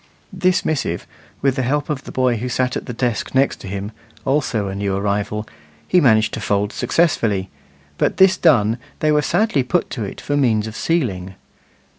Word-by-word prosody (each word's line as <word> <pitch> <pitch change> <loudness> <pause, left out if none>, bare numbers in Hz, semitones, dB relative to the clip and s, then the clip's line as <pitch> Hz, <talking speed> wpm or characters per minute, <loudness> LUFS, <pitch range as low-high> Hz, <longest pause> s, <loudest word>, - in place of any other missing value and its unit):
This 185 0 +1
missive, 135 - -1 0.4
with 135 -2 +3
the - - +1
help 145 +4 0
of 145 -3 -3
the - - -8
boy 125 -2 +1
who 125 +3 -3
sat 125 +1 0
at - - -5
the - - -3
desk 120 0 -2
next 135 +1 +2
him, 100 +2 -5 0.3
also 130 -7 0
a 95 - -4
new 100 0 -1
arrival, 105 +1 -2 0.4
he 180 - +4
managed 110 -6 +4
to - - -3
fold 100 0 0
successfully; 115 - +1 0.5
but - - +1
this 190 -1 +6
done, 120 - +3 0.2
they 155 - +1
were 150 0 +3
sadly 175 0 +1
put 145 +8 -1
to 115 - -3
it 100 - -6
for 145 - -2
means 115 -7 +2
of 110 0 -7
sealing. 100 - -1
125 Hz, 185 wpm, -20 LUFS, 105-145 Hz, 0.5 s, this